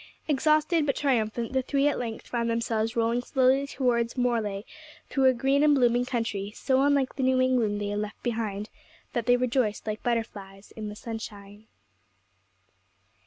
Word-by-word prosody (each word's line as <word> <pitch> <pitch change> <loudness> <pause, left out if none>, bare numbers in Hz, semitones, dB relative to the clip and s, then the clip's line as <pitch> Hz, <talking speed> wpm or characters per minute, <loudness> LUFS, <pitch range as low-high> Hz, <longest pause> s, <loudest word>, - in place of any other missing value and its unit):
Exhausted 305 +2 +2
but 275 - +1
triumphant, 235 -3 0
the 265 - +2
three 280 +2 +1
at 290 - 0
length 230 -2 -5
found 235 -1 -2
themselves 230 0 -1
rolling 230 +1 +1
slowly 265 +2 +2
towards 240 -3 0
Morlaix 225 -5 0 0.5
through 270 -1 +2
a 260 - +7
green 270 +3 +2
and 295 -1 +5
blooming 245 -2 +3
country, 225 -5 -2
so 265 -1 +1
unlike 280 -2 +2
the - - -1
New 260 0 +3
England 245 -5 +2
they 205 0 -3
had 205 0 -2
left 210 0 -6
behind, 220 -3 -3 0.4
that 235 -3 -2
they 245 0 +5
rejoiced 245 -3 0
like 215 -1 -3
butterflies 205 -4 -4
in 215 -1 -5
the 210 - -8
sunshine. 210 -2 -8
235 Hz, 165 wpm, -27 LUFS, 215-260 Hz, 0.5 s, a